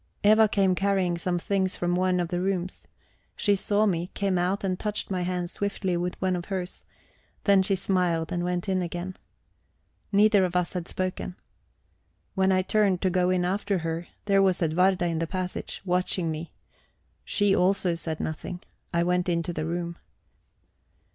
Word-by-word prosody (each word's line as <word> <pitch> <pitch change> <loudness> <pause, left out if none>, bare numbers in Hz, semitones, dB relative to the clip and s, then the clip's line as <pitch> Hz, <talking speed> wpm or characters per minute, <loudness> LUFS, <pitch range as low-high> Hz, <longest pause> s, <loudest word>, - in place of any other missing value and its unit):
Eva 215 +1 +6
came 195 -2 +3
carrying 190 -2 +1
some 175 +1 -1
things 190 +1 0
from 175 0 0
one 185 0 +2
of 175 -2 -1
the 175 -1 -1
rooms. 185 -1 -2 0.5
She 205 -1 +2
saw 205 +2 +1
me, 175 -3 0
came 195 -3 +1
out, 185 +3 0
and 185 -2 -1
touched 210 -1 -2
my 185 -1 0
hands 180 -1 -2
swiftly 200 -2 -1
with 175 +1 -2
one 185 -1 +1
of 175 0 -4
hers; 185 -2 -5 0.6
then 200 -2 +5
she 195 +1 +2
smiled 175 -4 0
and 175 0 -1
went 180 +1 -2
in 190 -1 +1
again. 175 +2 -4 1.0
Neither 205 -1 +5
of 180 -1 -1
us 180 -1 +1
had 180 -2 -4
spoken. 185 -1 -3 1.0
When 190 -1 +2
I 185 0 +3
turned 195 -2 +2
to 185 - +2
go 180 0 +2
in 180 -1 +2
after 200 +2 0
her, 165 +1 -3 0.2
there 195 -1 +4
was 190 -2 +3
Edwarda 180 +3 +2
in 165 -2 -1
the 165 - -1
passage, 185 +1 -4
watching 180 -2 0
me. 160 +2 -6 0.7
She 205 -2 +2
also 185 -1 +2
said 165 -2 -3
nothing. 175 +3 -4 0.3
I 170 -1 +2
went 180 +1 +1
into 170 0 -1
the 155 -1 -3
room. 170 0 -3
180 Hz, 175 wpm, -27 LUFS, 175-195 Hz, 1.0 s, Eva